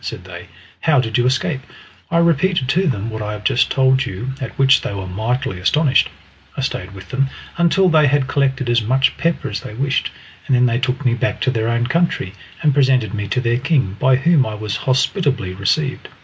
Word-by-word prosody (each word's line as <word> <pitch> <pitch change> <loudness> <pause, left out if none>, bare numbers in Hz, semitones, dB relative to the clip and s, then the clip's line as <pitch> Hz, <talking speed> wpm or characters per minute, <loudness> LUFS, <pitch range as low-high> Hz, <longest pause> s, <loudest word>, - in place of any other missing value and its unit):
said - - -6
they. - - -10 0.3
"How 150 -4 +3
did 115 -3 -2
you 120 - +2
escape?" 130 +2 0 0.5
I 170 - +1
repeated 170 -3 +2
to 185 +5 +2
them 115 -5 -2
what 110 0 -5
I 105 0 -3
have 105 0 -8
just 120 +5 +2
told 130 0 +3
you, 120 +2 -5
at 130 - -6
which 135 -1 +5
they 100 - -4
were 95 -1 -5
mightily 110 +4 -2
astonished. 135 - +2 0.5
I - - -2
stayed 95 +2 -4
with 95 -1 -11
them 135 +1 0 0.3
until 170 +3 +3
they 155 -4 +4
had 140 -1 +1
collected 135 -2 0
as 120 0 +2
much 130 +5 +1
pepper 170 0 -1
as 105 - -3
they 105 - -9
wished, 135 +3 -1 0.4
and 135 - +3
then 125 0 +4
they 120 -1 +1
took 130 +2 -2
me 120 - +3
back 120 - -1
to 130 - +1
their 115 -1 -1
own 120 0 0
country 145 - 0 0.3
and 150 -2 +3
presented 130 -6 +2
me 105 -1 -3
to 115 - -1
their 120 0 0
king, 130 - 0
by 130 0 +4
whom 145 +2 +3
I 110 -3 -4
was 105 -1 -4
hospitably 130 - 0
received. 135 +9 -1
130 Hz, 215 wpm, -19 LUFS, 110-145 Hz, 0.5 s, which